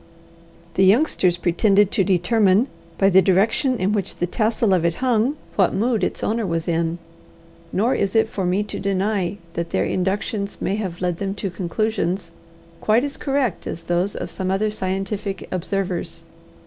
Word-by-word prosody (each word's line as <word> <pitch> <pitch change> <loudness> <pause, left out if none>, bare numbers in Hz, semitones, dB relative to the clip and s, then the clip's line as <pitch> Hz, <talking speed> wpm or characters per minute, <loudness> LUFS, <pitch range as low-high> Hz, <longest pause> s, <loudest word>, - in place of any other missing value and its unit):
The 190 - +3
youngsters 190 - +3
pretended 195 +3 +3
to 195 - +2
determine, 195 +5 +3 0.3
by 195 - +4
the 190 +1 +7
direction 215 - +2
in 190 -1 0
which 200 -4 -2
the 175 - -1
tassel 215 +2 +1
of 180 -3 +2
it 170 -1 +1
hung, 250 +3 +1 0.2
what 190 -3 +3
mood 225 +2 +1
its - - -2
owner 225 +1 0
was 165 -3 -2
in; 165 0 0 0.7
nor 230 +7 +2
is 200 0 -1
it 220 0 +4
for 200 -3 -4
me 185 +3 +1
to 210 - -6
deny 195 -1 0 0.2
that 170 0 -3
their - - 0
inductions 200 +2 -2
may 195 - -1
have 185 -5 -4
led 180 -2 0
them 195 +1 -3
to 195 -2 -3
conclusions 185 0 -2 0.5
quite 225 +5 +2
as 280 - -5
correct 270 - -1
as 170 - -5
those 175 +4 -1
of - - -5
some 185 -1 -3
other 205 +3 +1
scientific 195 0 -3
observers. 185 0 -3
195 Hz, 170 wpm, -22 LUFS, 180-215 Hz, 0.7 s, the